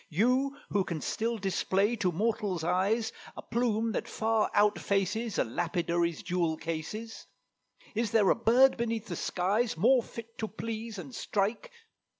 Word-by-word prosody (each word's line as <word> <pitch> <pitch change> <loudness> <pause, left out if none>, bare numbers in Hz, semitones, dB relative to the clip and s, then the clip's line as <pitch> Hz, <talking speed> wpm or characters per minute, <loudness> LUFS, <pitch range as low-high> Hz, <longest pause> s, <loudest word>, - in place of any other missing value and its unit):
You, 255 - +2
who 200 -1 +2
can 170 -4 -4
still 230 +8 -1
display 195 +2 +1
to 190 -4 +1
mortal's 205 -2 -1
eyes 200 +7 +1 0.2
A - - -7
plume 230 -1 0
that - - -3
far 220 -1 +1
outfaces 205 +1 +1
A - - +3
lapidary's 170 - -1
jewel 170 -3 0
cases? 165 +9 -5 0.7
Is 230 0 0
there 210 -3 +4
a - - +4
bird 245 +4 +5
beneath 230 -1 -2
the 180 -6 -5
skies 200 +7 0
More 245 +8 +5
fit 230 0 -10
to 220 - -1
please 225 0 -5
and 150 -8 -8
strike? 215 - -1
215 Hz, 150 wpm, -30 LUFS, 180-230 Hz, 0.7 s, bird